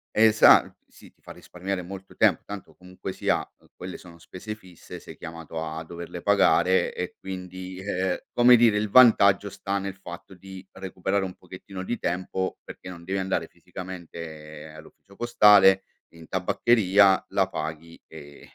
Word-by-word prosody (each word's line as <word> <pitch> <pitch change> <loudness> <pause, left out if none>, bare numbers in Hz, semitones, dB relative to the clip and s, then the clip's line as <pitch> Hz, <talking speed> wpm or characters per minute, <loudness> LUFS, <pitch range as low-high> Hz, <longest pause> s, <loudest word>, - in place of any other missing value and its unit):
esa 110 0 +6
sì, - - -18
ti - - -40
fa - - -11
risparmiare 90 +1 -6
molto 95 +1 -11
tempo, - - +3
tanto 100 -2 -9
comunque 90 +1 -9
sia, - - -1
ehm, - - -25
quelle 90 0 -8
sono 85 -2 -15
spese 95 +6 -8
fisse, 95 -6 -13
sei - - -12
chiamato 80 0 -7
a 80 0 -6
doverle 85 +1 -9
pagare. 95 0 +3
E 90 - -5
quindi 95 0 -8
e 95 -1 -4
e, - - -11
come 120 0 +6
dire, 115 -3 +4
il 105 - -2
vantaggio 100 -4 +5
sta 100 +1 -3
nel 95 -1 -6
fatto 95 0 -11
di 95 +1 -12
recuperare 95 +1 -3
un 90 - -6
pochettino 95 +1 -10
di 120 +4 -3
tempo 95 +1 -3
perché - - -11
non 85 -2 -10
devi 95 +2 -3
andare 95 0 -2
fisicamente 80 -4 -10
all'ufficio 80 +5 -16
postale, 100 -4 +5 0.3
in 80 -1 -15
tabaccheria, 95 0 +3
la - - 0
paghi, 80 +2 -7
ehm, 70 0 -13
95 Hz, 160 wpm, -25 LUFS, 85-100 Hz, 0.3 s, esa